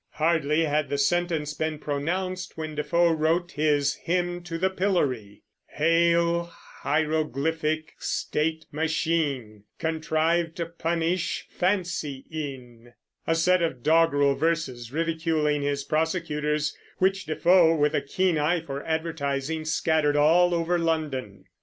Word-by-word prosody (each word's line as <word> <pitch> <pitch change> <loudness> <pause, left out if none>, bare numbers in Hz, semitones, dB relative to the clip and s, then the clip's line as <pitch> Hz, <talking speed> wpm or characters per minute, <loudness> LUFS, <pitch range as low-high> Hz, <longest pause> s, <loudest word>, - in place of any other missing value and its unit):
Hardly 160 0 +2
had 150 0 0
the 140 - -1
sentence 160 0 0
been 155 +1 -2
pronounced 180 +6 -3
when 155 -1 -4
Defoe 170 +3 +2
wrote 165 +2 +1
his 145 -1 +1
"Hymn 175 0 -1
to 165 -1 -4
the 190 +2 +1
Pillory," 140 - -1 0.3
Hail 170 +1 +3
hieroglyphic 155 0 -2
state 160 +1 -2
machine, 150 - -1
Contrived 160 +1 0
to 170 - -2
punish 170 +1 -2
fancy 175 -7 -1
in, 125 -6 -7 0.3
a 165 - +2
set 180 +2 +3
of 135 -8 -2
doggerel 150 -3 +4
verses 135 -7 -2
ridiculing 160 -2 0
his 140 0 -1
prosecutors, 155 -1 -1 0.2
which 195 +1 +1
Defoe, 165 +1 +4
with 150 -1 +2
a - - +1
keen 175 +3 0
eye 165 +3 +1
for 140 -3 -6
advertising, 160 -1 -2
scattered 155 -2 +1
all 170 +4 +4
over 170 +1 0
London. 135 - -2
160 Hz, 120 wpm, -26 LUFS, 145-170 Hz, 0.3 s, doggerel